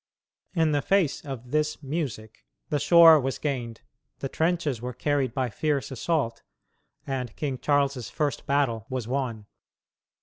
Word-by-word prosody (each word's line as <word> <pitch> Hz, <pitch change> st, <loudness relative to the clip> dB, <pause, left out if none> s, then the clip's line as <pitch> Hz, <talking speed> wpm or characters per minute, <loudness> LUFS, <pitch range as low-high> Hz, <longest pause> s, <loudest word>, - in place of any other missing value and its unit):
In 160 Hz, -2 st, +3 dB
the 145 Hz, -1 st, +1 dB
face 190 Hz, -3 st, +1 dB
of 125 Hz, -3 st, -7 dB
this 150 Hz, 0 st, 0 dB
"music" 125 Hz, -, -5 dB, 0.2 s
the 150 Hz, -, +1 dB
shore 165 Hz, +1 st, +8 dB
was 135 Hz, -1 st, -2 dB
gained, 120 Hz, -6 st, -3 dB, 0.4 s
the 135 Hz, -, -4 dB
trenches 160 Hz, -7 st, 0 dB
were 125 Hz, -1 st, -5 dB
carried 140 Hz, -1 st, 0 dB
by 125 Hz, -1 st, -2 dB
fierce 145 Hz, +2 st, -1 dB
assault 130 Hz, -2 st, -1 dB, 0.6 s
and 130 Hz, -5 st, -4 dB
King 135 Hz, -4 st, -3 dB
Charles's 140 Hz, -4 st, +1 dB
first 145 Hz, -4 st, -2 dB
battle 130 Hz, -6 st, +1 dB
was 130 Hz, -4 st, -3 dB
won. 120 Hz, -5 st, -2 dB
140 Hz, 140 wpm, -26 LUFS, 125-150 Hz, 0.6 s, shore